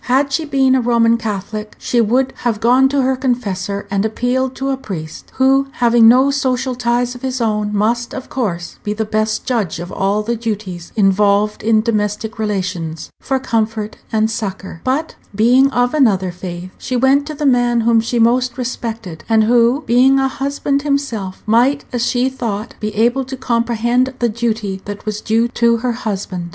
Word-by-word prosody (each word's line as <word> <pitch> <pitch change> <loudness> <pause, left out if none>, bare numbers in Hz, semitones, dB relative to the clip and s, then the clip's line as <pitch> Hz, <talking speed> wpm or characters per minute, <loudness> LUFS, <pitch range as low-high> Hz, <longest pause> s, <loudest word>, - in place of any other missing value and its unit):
Had 270 +2 +1
she 320 +2 0
been 270 -2 +2
a 260 - +3
Roman 230 -1 +3
Catholic, 215 -1 -5
she 240 - +1
would 250 +4 +1
have 230 -3 -1
gone 255 +4 +4
to 280 -1 +1
her 260 +1 +1
confessor, 205 -7 -2
and 200 0 +1
appealed 250 +4 -1
to 270 0 -2
a - - +1
priest 170 -11 -8
who, 270 +1 +3
having 235 -2 +4
no 260 +4 +5
social 260 -2 0
ties 245 0 0
of 245 - -11
his 260 -1 -3
own, 210 -2 0
must, 230 +4 0
of 260 - -6
course, 180 -9 -4
be 210 - -2
the 220 +1 -2
best 215 0 -1
judge 220 -10 -1
of 175 +2 -7
all 200 +2 0
the 235 +2 -1
duties 205 -6 -5
involved 205 0 +2
in 220 0 +3
domestic 215 -1 -2
relations 185 -6 -3
for 270 - -1
comfort 220 -3 -2
and 220 0 +1
succor; 195 -5 -5
but, 280 +5 -1 0.2
being 250 +6 +4
of 245 0 +1
another 200 -11 +2
faith, 180 0 -7
she 255 - -3
went 270 +3 +3
to 305 - -5
the 295 0 -3
man 245 -3 +3
whom 230 0 +3
she 235 +2 -2
most 240 +2 +2
respected, 225 -8 -5
and 220 -1 +4
who, 240 +5 +3
being 255 +3 +4
a 270 0 +2
husband 280 +1 -2
himself, 275 -10 -2
might, 245 +6 +2
as 240 -1 0
she 245 +1 +1
thought, 230 -4 -4
be 215 - -2
able 240 +5 +2
to 265 +1 -7
comprehend 240 +1 0
the 240 -2 +1
duty 215 -4 -2
that 205 0 -7
was 210 0 -3
due 225 +2 +1
to 235 -1 +2
her 245 +2 -1
husband. 195 -6 -4
235 Hz, 185 wpm, -17 LUFS, 210-255 Hz, 0.2 s, no